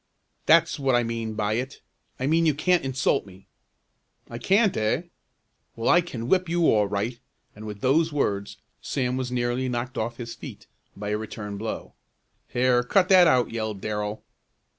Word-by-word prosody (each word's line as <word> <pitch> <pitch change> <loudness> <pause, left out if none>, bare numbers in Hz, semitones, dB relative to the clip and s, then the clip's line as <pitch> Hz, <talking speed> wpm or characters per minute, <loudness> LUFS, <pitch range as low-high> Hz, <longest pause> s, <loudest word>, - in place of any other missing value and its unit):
"That's 165 -1 +4
what 135 -2 +2
I 120 - +3
mean 115 -1 -4
by 105 0 0
it. 135 +2 -9 0.4
I 130 - -1
mean 165 +3 +3
you 150 - +2
can't 180 +4 +2
insult 135 +1 0
me!" 95 0 -15 0.9
"I 120 - -6
can't, 200 - +3
eh? 110 +9 0 0.7
Well, 115 - -1
I 175 - +6
can 120 -9 -6
whip 185 +2 +2
you 170 0 +2
all 105 -2 +3
right," 105 +5 -3 0.4
and 110 +1 -9
with 105 -1 -8
those 160 +5 +2
words 100 -8 -2 0.2
Sam 125 -2 -1
was 130 -1 -3
nearly 125 +1 -1
knocked 125 +2 -3
off 115 +1 -3
his 115 -1 -6
feet - - -10 0.3
by 105 +1 -5
a 105 0 -1
return 105 -1 -6
blow. 110 +1 -5 0.5
"Here, 125 0 +2
cut 180 +9 +2
that 185 -2 +7
out!" 125 -5 +3
yelled 110 -3 -3
Darrell. 105 +1 -4
120 Hz, 175 wpm, -25 LUFS, 110-145 Hz, 0.9 s, that